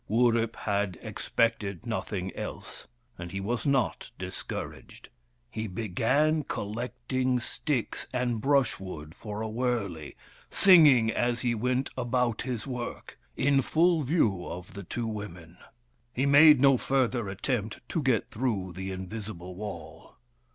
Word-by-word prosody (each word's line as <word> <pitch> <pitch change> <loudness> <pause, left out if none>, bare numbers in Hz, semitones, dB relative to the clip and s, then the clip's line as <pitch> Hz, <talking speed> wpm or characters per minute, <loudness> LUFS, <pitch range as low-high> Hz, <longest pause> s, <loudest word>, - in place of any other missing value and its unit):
Wurip 115 0 +2
had 100 -4 -1
expected 110 -4 -1
nothing 95 -5 -3
else, - - -7 0.3
and 85 -1 -6
he 95 - -3
was 115 +5 -2
not 135 -4 +1
discouraged. - - -7 0.4
He 110 0 -3
began 120 - +1
collecting 125 +4 -2
sticks 125 +1 -2
and 125 -3 -1
brushwood 95 - 0
for 105 +2 -6
a - - -2
wurley, 110 - -2 0.3
singing 150 -12 +7
as 120 +1 0
he 120 -2 +1
went 125 +3 0
about 125 -2 0
his 125 -3 -4
work, 125 -3 -6 0.2
in 135 +1 +3
full 165 +4 +3
view 125 - +1
of 90 +1 -8
the 100 - -7
two 115 +5 -4
women. 90 -6 -7 0.5
He 130 +3 0
made 145 +1 +8
no 135 -1 +6
further 125 -5 0
attempt 110 +2 -2
to 165 - -1
get 125 -3 +1
through 110 -7 -2
the 95 +1 -5
invisible 95 -1 -6
wall. 100 -4 -8
115 Hz, 130 wpm, -28 LUFS, 100-130 Hz, 0.5 s, made